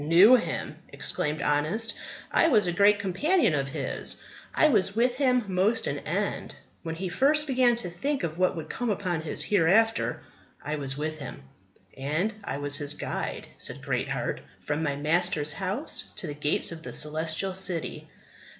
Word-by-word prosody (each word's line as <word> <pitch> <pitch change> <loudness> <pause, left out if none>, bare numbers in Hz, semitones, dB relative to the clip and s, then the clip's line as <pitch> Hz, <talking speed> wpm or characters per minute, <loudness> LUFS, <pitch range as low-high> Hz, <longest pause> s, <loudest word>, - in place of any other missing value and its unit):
"Knew 180 +11 +7
him!" 245 - -2
exclaimed 150 +1 -1
Honest, 155 +11 +1 0.4
"I - - +4
was 215 - +4
a 175 - 0
great 200 +3 +5
companion 205 - +1
of 140 -2 -1
his; - - -2 0.3
I - - +4
was 200 -6 +2
with 245 +2 +2
him 250 -3 +3
most 195 +5 +2
an - - -2
end. - - -3 0.3
When 165 -1 -5
he 185 +3 -4
first 285 - +3
began 255 -4 +3
to 210 -7 0
think 275 +8 -2
of 165 0 -3
what 185 0 +2
would 160 -2 -6
come 245 +6 -3
upon 185 -5 -1
us 160 - 0
hereafter, 210 +4 +2 0.4
I 150 +1 -2
was 135 -1 -2
with 155 +1 -3
him." 140 - -8 0.5
"And 155 +11 -1
I 140 - -4
was 145 0 -1
his 145 0 0
guide," - - -4
said - - 0
Greatheart, - - -2 0.2
"from 145 +1 -2
my 145 -3 -1
Master's 155 0 +1
house 200 +10 0
to - - -5
the 150 - -4
gates 150 +3 0
of 165 -1 -7
the - - -8
Celestial 160 +5 -1
City." 185 -3 -4
180 Hz, 170 wpm, -27 LUFS, 155-225 Hz, 0.5 s, Knew